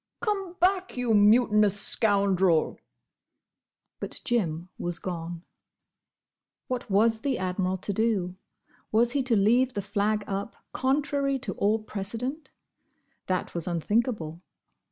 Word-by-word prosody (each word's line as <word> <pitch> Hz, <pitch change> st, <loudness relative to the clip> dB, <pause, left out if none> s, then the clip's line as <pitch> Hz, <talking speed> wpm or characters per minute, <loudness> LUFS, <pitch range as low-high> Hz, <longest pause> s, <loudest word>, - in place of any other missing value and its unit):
"Come 395 Hz, -5 st, -2 dB
back! 370 Hz, -2 st, +1 dB
you 245 Hz, -2 st, +1 dB
mutinous 210 Hz, -1 st, +5 dB
scoundrel!" 195 Hz, -6 st, +2 dB, 1.2 s
But -, -, -5 dB
Jim 180 Hz, -8 st, -1 dB
was 175 Hz, -1 st, -3 dB
gone. 170 Hz, -1 st, -6 dB, 1.2 s
What 250 Hz, -2 st, -4 dB
was 220 Hz, +3 st, +3 dB
the 275 Hz, -3 st, 0 dB
Admiral 185 Hz, 0 st, -1 dB
to 200 Hz, +2 st, -4 dB
do? 195 Hz, -4 st, 0 dB, 0.6 s
Was 235 Hz, +2 st, +3 dB
he 280 Hz, -, +1 dB
to 250 Hz, -3 st, +1 dB
leave 240 Hz, +5 st, +3 dB
the 205 Hz, -, -2 dB
flag 210 Hz, +1 st, 0 dB
up, 200 Hz, +3 st, -4 dB, 0.2 s
contrary 275 Hz, 0 st, 0 dB
to 265 Hz, -, -5 dB
all 210 Hz, +2 st, +1 dB
precedent? 225 Hz, +8 st, -5 dB, 0.8 s
That 185 Hz, -1 st, -2 dB
was 170 Hz, 0 st, -3 dB
unthinkable. 175 Hz, -1 st, -1 dB
215 Hz, 115 wpm, -27 LUFS, 185-250 Hz, 1.2 s, mutinous